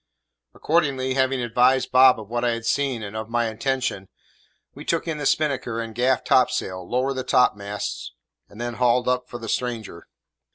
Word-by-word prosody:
Accordingly, 140 -5 0
having 130 0 +1
advised 125 +3 +2
Bob 130 -1 +6
of 105 - -9
what 120 +2 -2
I 120 -1 +2
had 115 -1 -5
seen 130 -2 0
and 100 +1 -7
of 110 0 -5
my 120 0 +1
intention, 110 -4 -2 0.6
we - - -10
took - - -1
in 160 -2 -3
the 145 - 0
spinnaker 135 -6 0
and 115 -1 -5
gaff 125 +3 +1
topsail, 95 -8 +1
lowered 130 +2 0
the 130 - -2
topmast, 105 -6 0 0.4
and 105 - -14
then 120 0 -3
hauled 125 0 +2
up 125 0 0
for 120 - -6
the 115 -1 -8
stranger. 115 -8 -4
125 Hz, 175 wpm, -23 LUFS, 115-130 Hz, 0.6 s, Bob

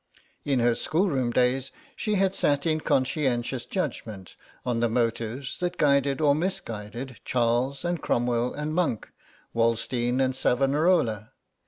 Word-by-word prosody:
In 135 -4 +1
her 120 0 +4
schoolroom 145 - 0
days 125 +2 +1 0.2
she 215 -2 -1
had 195 -1 +2
sat 145 -6 +1
in 155 -1 +1
conscientious 130 -3 0
judgment 110 - -4 0.3
on 120 -2 0
the 120 0 +2
motives 115 +2 -2
that 180 0 -2
guided 140 -1 +3
or 150 -2 +4
misguided 125 - -4
Charles 125 +4 0
and 175 -2 -1
Cromwell 120 0 0
and 150 +1 -4
Monck, 160 -10 -1 0.4
Wallenstein 120 +2 +1
and 130 -1 +1
Savonarola. 135 - +1
130 Hz, 130 wpm, -26 LUFS, 120-150 Hz, 0.4 s, her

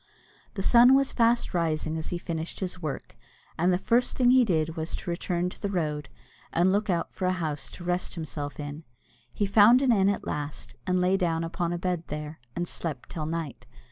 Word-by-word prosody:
The 195 - -3
sun 245 +4 +7
was 275 0 +3
fast 235 0 +2
rising 160 -2 0
as 160 -1 -4
he 175 - -3
finished 165 -1 -5
his 180 -1 -4
work, 150 -4 -5 0.4
and 175 +3 +2
the 180 - +3
first 240 +6 +1
thing 250 -1 +5
he 255 0 +6
did 165 -6 0
was 160 0 -3
to 175 - -5
return 175 0 -1
to - - -12
the 200 - -1
road, 150 -6 -2 0.4
and 175 +3 +3
look 205 +2 0
out 175 -2 -1
for 185 -1 -2
a - - +3
house 155 -5 -3
to 175 - -10
rest 175 +1 -1
himself 150 -3 -5
in. 145 +2 -6 0.5
He 205 - -1
found 210 +5 +6
an 260 - +4
inn 195 -3 +4
at 200 - -2
last, 145 0 -5
and 180 0 +2
lay 185 +2 +3
down 165 -3 0
upon 170 +1 -2
a 175 - -1
bed 175 -1 -2
there, 150 +1 -6 0.2
and 175 0 -2
slept 155 -7 -5
till 155 -2 -4
night. 165 -3 -5
175 Hz, 210 wpm, -27 LUFS, 160-195 Hz, 0.5 s, sun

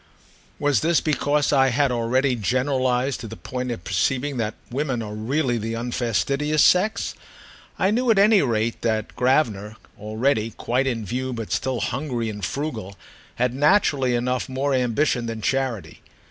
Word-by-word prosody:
Was 145 -1 +2
this 165 +1 +2
because 145 -1 +1
I 135 -1 +5
had 135 +2 +2
already 125 +3 +1
generalised 130 +2 0
to 115 - -7
the 110 - -8
point 125 +8 -5
of 115 -7 -5
perceiving 130 +10 0
that 110 -2 -2 0.2
women 130 -3 -2
are 105 -1 -6
really 120 +3 -1
the 115 +1 -3
unfastidious 125 +5 0
sex? 205 +5 +3 0.6
I 190 - +2
knew 245 +3 +1
at 220 - +4
any 205 0 +6
rate 115 -3 -1
that 110 -2 -1
Gravener, 115 -5 +1 0.2
already 110 +2 -1
quite 130 +3 0
in 115 -4 -2
view 130 +5 -3
but 115 -3 -6
still 130 -2 -1
hungry 125 -4 -2
and 105 -1 -8
frugal, 110 - -4 0.4
had 125 0 0
naturally 140 -3 +3
enough 125 +2 -1
more 135 +2 -1
ambition 125 0 +1
than 115 -1 -4
charity. 130 -2 -2
125 Hz, 155 wpm, -23 LUFS, 115-140 Hz, 0.6 s, any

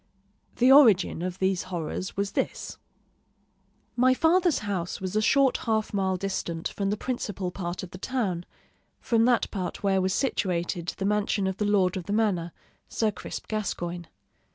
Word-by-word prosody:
The 250 +2 +5
origin 225 - +6
of 180 0 -3
these 190 -1 +1
horrors 175 +1 -4
was 200 0 -1
this: - - -3 1.2
My 255 +1 +4
father's 340 +1 +3
house 185 -4 -3
was 185 +1 -4
a 215 - +3
short 270 +3 +3
half 220 -2 -1
mile 190 -2 0
distant 175 -3 -3
from 195 -1 -2
the 210 - -1
principal 205 -7 -3
part 175 -1 -5
of 180 - -8
the 185 - -9
town, 195 -9 -2 0.5
from 230 -2 +2
that 245 -1 +2
part 185 -2 -4
where 195 -1 +2
was 185 0 0
situated 175 -9 -1
the 195 - -2
mansion 205 -1 +1
of 190 0 -2
the 210 - 0
lord 195 -3 +2
of 180 - -5
the 205 - -1
manor, 195 -6 +1 0.4
Sir 220 -2 0
Crisp - - -7
Gascoigne. 175 -5 -3
195 Hz, 165 wpm, -27 LUFS, 180-220 Hz, 1.2 s, origin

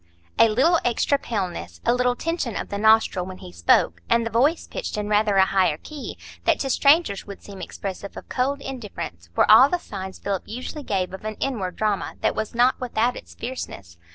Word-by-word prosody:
A 230 - +7
little 295 +10 +3
extra 245 +4 +1
paleness, 180 - -4
a - - +4
little 250 0 +2
tension 325 -7 -2
of - - -4
the 200 - -3
nostril 220 -3 +4
when 185 0 -8
he 90 - -11
spoke, 85 -1 +2
and 235 0 +3
the 230 - -3
voice 285 +8 +2
pitched - - -5
in 210 0 -2
rather 210 -1 +3
a 190 -1 +6
higher 185 -6 +2
key, 280 - -8 0.3
that - - +4
to 270 - -1
strangers 280 - +3
would 200 - -9
seem 195 -2 -10
expressive 195 0 -6
of - - -9
cold 275 +2 -1
indifference, 205 - -7
were - - +4
all 255 +6 +9
the 355 - +1
signs 190 - -7
Philip 195 -2 -3
usually 255 +6 -6
gave 190 -6 -1
of 190 - -8
an 215 0 -4
inward 205 -10 -3
drama 210 -2 -1
that - - +2
was 220 +1 -4
not 245 +2 +3
without 245 0 0
its - - -11
fierceness. 100 - -7
215 Hz, 205 wpm, -24 LUFS, 190-255 Hz, 0.3 s, all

